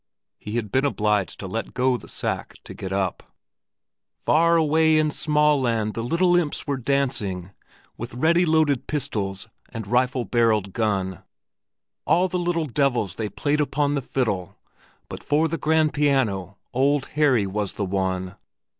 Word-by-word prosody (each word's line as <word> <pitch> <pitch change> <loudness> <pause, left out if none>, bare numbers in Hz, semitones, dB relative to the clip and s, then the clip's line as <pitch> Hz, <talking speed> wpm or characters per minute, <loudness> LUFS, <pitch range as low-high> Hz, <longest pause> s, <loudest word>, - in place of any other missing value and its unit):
He 105 - -7
had 110 -4 -2
been 130 - +2
obliged 105 -7 0
to 95 - -5
let 115 +6 -5
go 130 0 +2
the - - -8
sack - - -3
to - - -9
get 95 - -7
up. 95 -2 -1 1.0
"Far 170 +1 +3
away 160 0 +3
in 155 0 +2
Smaaland 145 -8 +1
the 115 - -3
little 175 +9 +2
imps 170 -4 0
were 140 -1 -1
dancing 115 -9 -1 0.5
With 120 +1 -6
ready 170 +7 +3
loaded 155 -5 +2
pistol 110 -10 -2 0.3
and 115 -3 -6
rifle 125 +3 +1
barrelled 110 -3 +1
gun; 95 -5 -1 0.8
All 180 +2 +3
the 180 0 -2
little 175 -2 0
devils 125 - 0
they 105 +1 -4
played 150 +5 0
upon 145 0 0
the 140 - 0
fiddle, 105 -7 -2 0.5
But - - -8
for 150 +3 +2
the 165 0 -3
grand 155 +1 +2
piano 110 -10 0 0.2
Old 140 +2 +1
Harry 140 -8 +3
was 100 0 -3
the 100 - -2
one." 95 0 -2
125 Hz, 155 wpm, -24 LUFS, 105-150 Hz, 1.0 s, Far